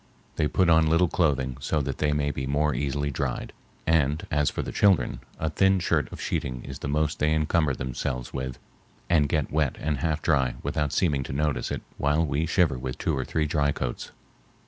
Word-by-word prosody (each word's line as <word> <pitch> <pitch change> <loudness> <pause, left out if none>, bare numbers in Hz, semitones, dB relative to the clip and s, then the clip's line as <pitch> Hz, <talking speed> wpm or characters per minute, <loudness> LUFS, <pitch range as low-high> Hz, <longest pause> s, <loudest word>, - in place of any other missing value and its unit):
They 75 - +1
put 95 +3 +2
on 80 -1 +5
little 85 +3 +4
clothing 70 -7 0
so 75 +3 0
that 70 -1 -4
they 75 -1 +2
may 75 -1 0
be 65 -1 -4
the - - -2
more 75 +1 +2
easily 70 +2 -1
dried, - - -3 0.3
and 80 +1 +2
as 75 -2 +2
for - - -3
the - - -5
children, 85 -13 +3 0.2
a 80 0 -2
thin 95 +3 +3
shirt 80 -4 0
of - - -8
sheeting 65 -1 -3
is 65 -1 -7
the - - -4
most 75 +1 0
they 75 +1 +2
encumber 75 -2 +1
themselves 65 0 -4
with, 65 -1 -4 0.5
and 75 -4 +4
get 75 -2 0
wet 75 -4 +1
and 75 -3 -1
half 80 +1 -1
dry 65 -6 +2
without 75 -2 -1
seeming 75 -7 +1
to - - -5
notice 75 +1 0
it - - -4 0.2
while 75 +3 +2
we 75 +2 -1
shiver 80 -6 +2
with 65 0 -4
two 80 - 0
or 65 - -1
three 80 -1 0
dry 75 -1 +1
coats. 60 -3 -4
75 Hz, 210 wpm, -26 LUFS, 70-80 Hz, 0.5 s, on